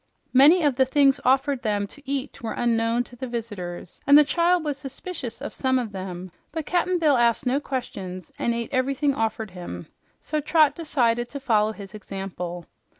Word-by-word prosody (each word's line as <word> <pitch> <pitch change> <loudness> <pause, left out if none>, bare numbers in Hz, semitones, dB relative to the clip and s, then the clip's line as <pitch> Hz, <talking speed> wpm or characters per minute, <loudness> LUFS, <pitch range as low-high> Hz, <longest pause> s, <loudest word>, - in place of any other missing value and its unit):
Many 300 +7 +7
of 285 -4 +2
the 265 - +5
things 275 0 +4
offered 270 +1 +2
them 205 -2 0
to 285 +8 -13
eat 275 0 -3
were 225 - -3
unknown 230 0 +1
to 245 - -14
the 260 +2 -5
visitors, 205 -8 -6
and 285 +1 +9
the 300 - +8
child 345 +3 +2
was 290 -2 -2
suspicious 270 -2 -6
of 290 - -5
some 260 -1 +1
of 240 -4 -2
them, 185 -2 -6 0.2
but 320 -1 -4
Cap'n 360 +1 +1
Bill 305 -5 +3
asked 235 +3 +2
no 255 +3 +2
questions 190 - -5
and 235 - 0
ate 235 -1 -3
everything 275 +2 +1
offered 220 -4 -2
him, 180 -1 -7 0.3
so 305 -1 -2
Trot 305 0 +4
decided 240 -7 0
to 280 - -6
follow 220 -5 +2
his 200 -2 -10
example. 185 -4 -6
250 Hz, 185 wpm, -24 LUFS, 215-285 Hz, 0.3 s, and